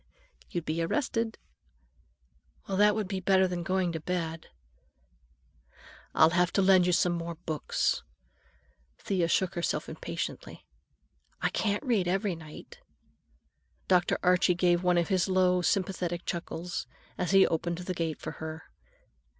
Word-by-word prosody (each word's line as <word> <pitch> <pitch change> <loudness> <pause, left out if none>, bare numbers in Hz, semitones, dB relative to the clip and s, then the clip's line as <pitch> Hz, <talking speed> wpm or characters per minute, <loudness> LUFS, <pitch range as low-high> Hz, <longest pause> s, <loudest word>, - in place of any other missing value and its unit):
"You'd 170 -2 -4
be 160 +2 -1
arrested." 230 - -1 1.3
"Well, 195 - -2
that 210 +1 +4
would 215 -3 -2
be 190 0 -3
better 190 0 +3
than 180 -1 -3
going 185 0 0
to 165 - -4
bed." 165 -1 -3 1.7
"I'll 160 - +6
have 175 0 +2
to 195 - +3
lend 185 -2 +5
you - - +3
some 175 0 +2
more 170 0 -4
books." 160 -2 -1 1.0
Thea 185 -4 0
shook 185 +1 +1
herself 175 - -2
impatiently. - - -6 0.7
"I - - +1
can't 205 +2 -1
read 220 -8 +1
every 195 +2 0
night." 160 - -12 1.1
Dr. 180 -1 +3
Archie 180 0 +4
gave 175 0 +2
one 180 -1 +2
of 170 - +1
his 185 -3 +2
low, 185 -1 +3
sympathetic 175 -1 -1
chuckles 175 0 -4 0.3
as 180 - -2
he 195 0 +6
opened 170 +1 -1
the 180 +1 -4
gate 165 -3 -3
for - - -5
her. 160 0 -7
180 Hz, 140 wpm, -29 LUFS, 170-190 Hz, 1.7 s, I'll